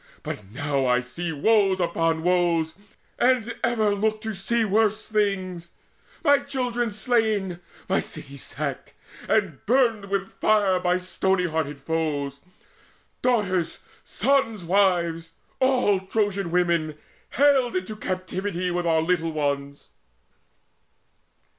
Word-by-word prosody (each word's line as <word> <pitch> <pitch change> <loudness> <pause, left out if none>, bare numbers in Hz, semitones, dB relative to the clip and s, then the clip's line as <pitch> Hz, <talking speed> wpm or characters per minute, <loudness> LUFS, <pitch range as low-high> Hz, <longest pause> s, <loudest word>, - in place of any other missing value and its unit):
But 105 - -6
now 135 +6 -1
I 125 0 +3
see 165 +7 -5
Woes 195 +4 +3
upon 165 -2 0
woes, 170 -3 +2 0.5
and 245 -2 +2
ever 215 -3 +2
look 215 +2 0
to 220 -1 -4
see 225 +4 0
Worse 215 +1 +1
things 190 -5 -1 0.5
my 285 -3 +5
children 245 -4 -2
slain, 215 -5 0 0.3
my 190 - +2
city 140 -3 -7
sacked 140 - -5 0.3
And 190 -10 +1
burned 230 -4 +3
with 195 0 -2
fire 205 -4 +3
by 180 0 +1
stony 185 0 0
hearted 155 -4 -2
foes, 145 -2 -2 0.8
Daughters, 190 -9 0 0.2
sons' 240 -5 +1
wives, 170 -3 +1 0.3
all 250 -7 +3
Trojan 195 -1 -1
women, 170 -3 +1 0.4
haled 270 -4 +3
Into 185 +4 -3
captivity 185 -1 -3
with 175 0 -1
our 160 -1 +3
little 165 -1 0
ones!" 140 -2 -3
185 Hz, 115 wpm, -25 LUFS, 165-215 Hz, 0.8 s, my